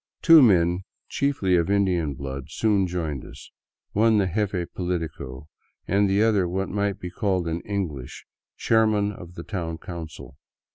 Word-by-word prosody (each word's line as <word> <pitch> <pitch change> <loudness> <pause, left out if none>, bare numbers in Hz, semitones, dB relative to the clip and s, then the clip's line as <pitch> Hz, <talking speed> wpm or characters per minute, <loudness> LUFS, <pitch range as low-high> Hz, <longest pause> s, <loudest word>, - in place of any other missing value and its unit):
Two 165 -2 +9
men, 90 -6 +4 0.3
chiefly 130 -10 +1
of 85 +2 0
Indian 90 -7 +1
blood, 70 0 -6
soon 105 -4 +1
joined 80 -6 -3
us, - - -13 0.4
one 110 +1 +3
the 100 - +3
jefe 100 -4 -1
politico, 80 -7 -4 0.4
and 100 +1 +2
the 100 +2 +3
other 105 -5 +2
what 95 +2 -2
might 100 -1 -1
be 90 - -6
called 95 -4 -1
in 85 +1 -2
English 85 -11 -5 0.3
chairman 110 -2 +2
of 90 -3 -11
the 85 - -7
town 85 -5 -4
council. 80 -5 -9
90 Hz, 150 wpm, -24 LUFS, 85-100 Hz, 0.4 s, Two